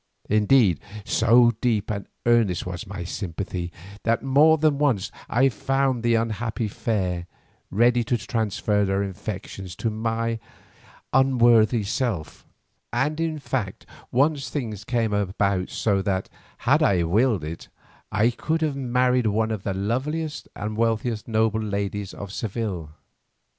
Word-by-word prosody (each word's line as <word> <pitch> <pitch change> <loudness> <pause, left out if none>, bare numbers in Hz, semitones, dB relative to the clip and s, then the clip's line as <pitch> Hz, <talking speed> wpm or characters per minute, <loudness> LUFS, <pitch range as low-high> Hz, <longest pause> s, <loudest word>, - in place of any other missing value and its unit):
Indeed 105 -3 +4 0.3
so 120 +1 +5
deep 110 -4 +1
and 100 -1 -4 0.2
earnest 115 -7 +3
was 90 +4 -5
my 95 -2 -5
sympathy 90 -1 -4 0.3
that 115 +2 +1
more 145 +4 +5
than 150 -2 +2
once 115 -8 +1 0.2
I 130 +4 +4
found 135 +2 0
the 120 0 +2
unhappy 115 0 -1
fair 95 -5 -2 0.4
ready 120 +4 +3
to 120 +2 +1
transfer 105 -2 0
their 95 0 +1
affections 95 -2 -6
to 105 +4 -2
my 115 +1 -1 0.7
unworthy 120 -4 +4
self, 100 - -3 0.4
and 145 +6 0
in 165 -1 -1
fact 125 -9 -3 0.3
once 140 +2 +2
things 110 -8 -4
came 115 -3 0
about 100 -1 0
so 100 -3 +1
that, 95 -1 -1 0.4
had - - +4
I 90 -3 +3
willed 105 +2 +2
it, 80 +2 -6 0.4
I 105 +4 +3
could 160 +6 -2
have 150 -3 0
married 125 -2 +2
one 110 +1 +1
of 110 -3 -3
the 95 0 -3
loveliest 145 +10 -2
and 105 +1 -4
wealthiest 115 -1 0
noble 110 -1 +1
ladies 100 -1 -3
of 100 -1 -8
Seville. 100 -7 -3
110 Hz, 135 wpm, -24 LUFS, 100-125 Hz, 0.7 s, so